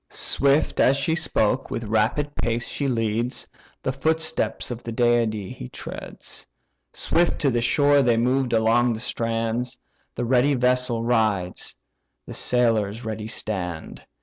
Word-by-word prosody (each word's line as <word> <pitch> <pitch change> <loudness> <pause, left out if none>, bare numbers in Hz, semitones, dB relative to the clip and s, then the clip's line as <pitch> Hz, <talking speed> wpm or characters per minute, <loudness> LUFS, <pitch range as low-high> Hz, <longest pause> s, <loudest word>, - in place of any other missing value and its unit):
Swift 140 +2 +2
as 135 +2 +4
she 150 +4 0
spoke, 130 -6 0
with 115 - -3
rapid 110 +7 0
pace 115 0 -1
she 140 - -2
leads; 115 0 -1 0.4
The 130 - 0
footsteps 160 +1 0
of 120 -1 -5
the 115 - -6
deity 115 -4 +1
he 60 - -8
treads. - - -9 0.4
Swift 170 0 +1
to 140 -4 +3
the 120 -1 0
shore 145 +4 +4
they 120 -3 +3
move 125 +2 +1
along 115 +1 +3
the 110 - -5
strand; 115 +1 -2 0.4
The 120 - -2
ready 130 +3 +3
vessel 125 -2 +1
rides, 110 -6 0 0.5
the - - -8
sailors 115 -3 +1
ready 110 -1 -4
stand. 90 -7 -5
120 Hz, 140 wpm, -24 LUFS, 110-130 Hz, 0.5 s, as